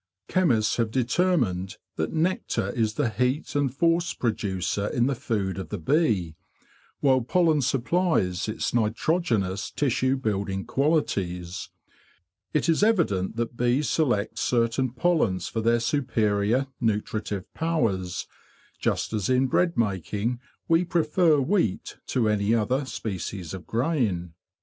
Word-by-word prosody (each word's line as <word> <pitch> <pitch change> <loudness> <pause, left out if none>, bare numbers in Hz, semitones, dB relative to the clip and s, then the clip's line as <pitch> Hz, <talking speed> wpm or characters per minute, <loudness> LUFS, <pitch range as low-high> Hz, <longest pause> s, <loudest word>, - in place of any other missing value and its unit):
Chemists 125 -13 +2
have 115 -2 +1
determined 120 - 0 0.2
that 80 - -2
nectar 170 +4 0
is 110 -3 -1
the 145 -5 +1
heat 125 +7 -1
and 140 -3 +1
force 170 +5 +1
producer 100 -3 -1
in 120 +2 +1
the 140 - +1
food 100 -6 -2
of 95 - -6
the 105 - -3
bee, 95 - +1 0.7
while 130 -2 +4
pollen 160 +4 +2
supplies 130 - +1
its 110 - -2
nitrogenous 110 - 0
tissue 130 -1 +1
building 100 -5 -2
qualities. 95 - -1 0.8
It 150 - +1
is 165 +1 +3
evident 160 - +2
that 120 +1 -3
bees 125 +5 +1
select 120 -10 0
certain 120 +1 +1
pollens 130 - +1
for 115 - -2
their 115 +1 +3
superior 115 -2 +1
nutritive 105 -3 -2
powers, 110 - -1 0.5
just - - -1
as 105 -1 -1
in 130 +1 +3
bread 170 +6 +1
making 105 +3 -1 0.3
we 165 +1 +4
prefer 165 -2 +2
wheat 140 - 0
to 120 -4 +1
any 105 +1 +2
other 125 +5 0
species 95 -7 -5
of 95 -2 -8
grain. 110 - 0
120 Hz, 125 wpm, -26 LUFS, 100-145 Hz, 0.8 s, while